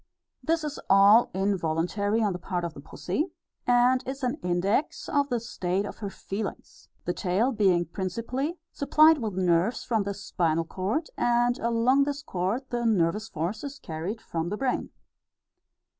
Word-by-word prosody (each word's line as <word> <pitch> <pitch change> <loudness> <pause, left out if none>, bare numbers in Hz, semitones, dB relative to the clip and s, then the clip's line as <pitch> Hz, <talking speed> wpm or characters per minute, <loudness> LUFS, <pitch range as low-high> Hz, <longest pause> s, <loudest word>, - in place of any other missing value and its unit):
This 325 0 0
is 295 -1 -4
all 200 +4 +7
involuntary 195 +3 0
on 205 -3 +1
the 180 - -5
part 180 -1 -3
of 170 -2 -3
pussy, 300 - -3 0.4
and 245 +1 +4
is 270 +1 -5
an 250 +3 0
index 180 - 0
of 285 -1 +1
the 245 -2 0
state 195 -4 -2
of - - -7
her 205 -3 -4
feelings, 195 +1 -7 0.2
the 175 - 0
tail 200 +8 +1
being 190 -7 +3
principally 230 - -3
supplied 310 +2 +5
with 215 -6 -3
nerves 185 +4 +1
from 225 -3 +1
the 200 0 -3
spinal 165 -4 0
chord, 200 - -2
and 240 +1 +2
along 235 +4 +3
this 290 0 -3
chord 190 +6 -2
the 240 -1 -1
nervous 210 0 +1
force 175 +7 -3
is 285 0 -6
carried 170 +8 -5
from 165 0 -3
the 210 - -3
brain. 260 +1 -1
210 Hz, 160 wpm, -27 LUFS, 180-250 Hz, 0.4 s, all